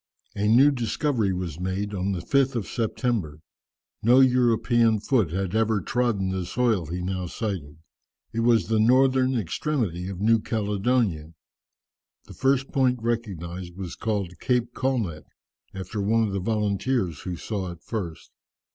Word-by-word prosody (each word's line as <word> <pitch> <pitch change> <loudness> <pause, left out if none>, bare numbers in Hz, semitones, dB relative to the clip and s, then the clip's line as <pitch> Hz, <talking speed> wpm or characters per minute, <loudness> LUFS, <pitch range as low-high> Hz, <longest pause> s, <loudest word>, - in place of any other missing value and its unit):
A 105 0 0
new 130 +7 +6
discovery 120 -3 0
was 90 -4 -4
made 95 +3 -2
on 95 0 -1
the 90 -3 -2
5th 135 +2 +2
of 115 -5 -1
September. 110 - -2 0.6
No 120 +4 +5
European 120 -3 +3
foot 110 - +1
had 95 +2 -2
ever 110 -1 +2
trodden 110 -4 0
the 95 -1 -2
soil 110 -3 0
he 90 +3 -4
now 90 -1 -3
sighted. 90 -8 -4 0.6
It 115 - -2
was 115 -4 +3
the 110 +2 +1
northern 130 +3 +4
extremity 100 - -2
of 95 -2 -6
New 115 +2 +4
Caledonia. 105 -6 -1 0.9
The - - -12
first 135 0 +1
point 130 -2 +2
recognized 95 -7 -4
was 95 -3 -6
called 100 -5 -3
Cape 120 -1 0
Colnett, 110 - -2 0.5
after 95 +2 -4
one 115 +3 +2
of 105 -3 -1
the 100 - -1
volunteers 105 - -1
who 90 -2 -5
saw 95 +1 -4
it 85 -1 -13
first. 90 -8 -5
105 Hz, 145 wpm, -25 LUFS, 90-120 Hz, 0.9 s, new